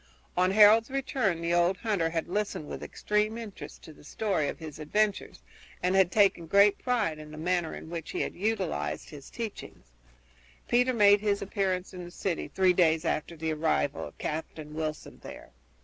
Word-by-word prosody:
On 185 +1 +3
Harold's 215 +4 +6
return 255 -10 -1
the 170 0 0
old 175 +2 +3
hunter 195 -6 0
had 165 -1 -2
listened 200 -5 -2
with - - -7
extreme 210 +1 -1
interest 225 -4 -9
to 160 - -11
the 150 - -18
story 190 -2 -1
of - - -4
his 155 -2 -9
adventures 205 +7 -1 0.4
and 180 +1 +2
had 190 -2 +4
taken 195 -5 +3
great 200 +3 +5
pride 220 -11 0
in 155 0 -10
the 155 - -10
manner 175 0 -1
in - - -9
which 165 -1 -6
he - - -2
had - - -2
utilized 75 - -2
his 145 -3 -11
teachings. 220 - -8 0.8
Peter 250 +1 +3
made 205 -2 +6
his 205 -2 0
appearance 190 -2 -2
in 180 -1 -7
the 175 - -8
city 175 -1 -3
three 185 -1 +3
days 165 -2 +3
after 165 +1 -2
the 160 0 -2
arrival 155 -2 0
of - - -15
Captain 155 -1 -5
Wilson 155 -1 -5
there. - - -11
180 Hz, 180 wpm, -28 LUFS, 160-210 Hz, 0.8 s, Harold's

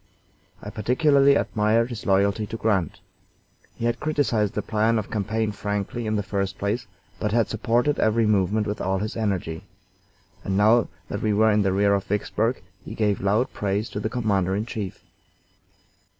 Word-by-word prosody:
I - - -6
particularly 140 +5 +3
admired 115 0 +1
his 115 -3 -7
loyalty 100 +2 +2
to 115 - -5
Grant. 95 -8 0 0.8
He 115 - -4
had 120 0 0
criticised 125 -9 0
the - - -1
plan 110 +1 +1
of 110 - -4
campaign 110 +1 -1
frankly 105 +3 -3
in 110 - 0
the 105 - 0
first 100 -1 -2
place, 100 +4 -2 0.3
but 105 - -1
had 115 -1 +2
supported 120 +6 +1
every 110 +1 +2
movement 105 0 +2
with 105 0 -3
all 95 +1 0
his 105 +3 -4
energy, 95 -6 -2 0.8
and 95 0 -1
now 110 +2 +4 0.2
that - - -4
we 110 -1 +1
were 110 +2 +4
in 105 0 +3
the 95 -1 +1
rear 100 +1 +3
of 100 -1 0
Vicksburg 105 +3 -1 0.2
he 110 - -8
gave 105 -3 0
loud 105 +6 +1
praise 100 +2 -2
to - - -4
the 110 - -2
commander 100 -6 0
in 105 +2 -2
chief. 105 -5 -6
105 Hz, 175 wpm, -24 LUFS, 100-115 Hz, 0.8 s, now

